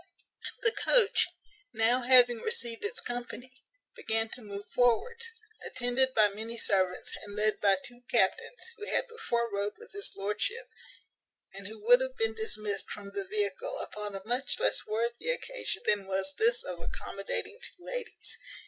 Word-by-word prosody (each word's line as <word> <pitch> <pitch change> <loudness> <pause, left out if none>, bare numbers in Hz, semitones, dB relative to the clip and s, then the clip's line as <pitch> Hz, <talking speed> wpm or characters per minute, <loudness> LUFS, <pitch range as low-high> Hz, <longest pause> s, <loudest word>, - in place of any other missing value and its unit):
The 450 - +5
coach, 470 -1 +3 0.5
now 230 +3 +3
having 245 -1 +6
received 240 - -1
its 420 +4 -2
company, 245 +1 -5 0.4
began 225 0 -1
to 250 - -9
move 205 -1 -7
forwards, 460 - +2 0.4
attended 255 +1 +1
by 215 -1 +6
many 220 +3 -6
servants, 185 -4 +1
and 205 -1 -8
led 215 +1 +4
by 200 -1 +5
two 245 0 -10
captains, 220 - +2
who 420 -1 -7
had - - +1
before 235 - -2
rode 200 - -2
with 460 +2 -13
his 405 -1 -2
lordship, 210 - -2 0.9
and 195 0 -7
who 220 +1 -8
would 245 +2 +7
have 260 0 -3
been 225 0 +1
dismissed 215 -2 0
from 200 -1 -7
the 390 - -4
vehicle 465 +5 0
upon 210 - -5
a 195 0 -6
much 245 +3 0
less - - +1
worthy 235 - -1
occasion - - -2
than 205 -2 +1
was 195 +9 -1
this 470 +5 +3
of - - -6
accommodating 465 -2 -4
two 360 -6 -6
ladies. - - -4
240 Hz, 155 wpm, -30 LUFS, -, 0.9 s, would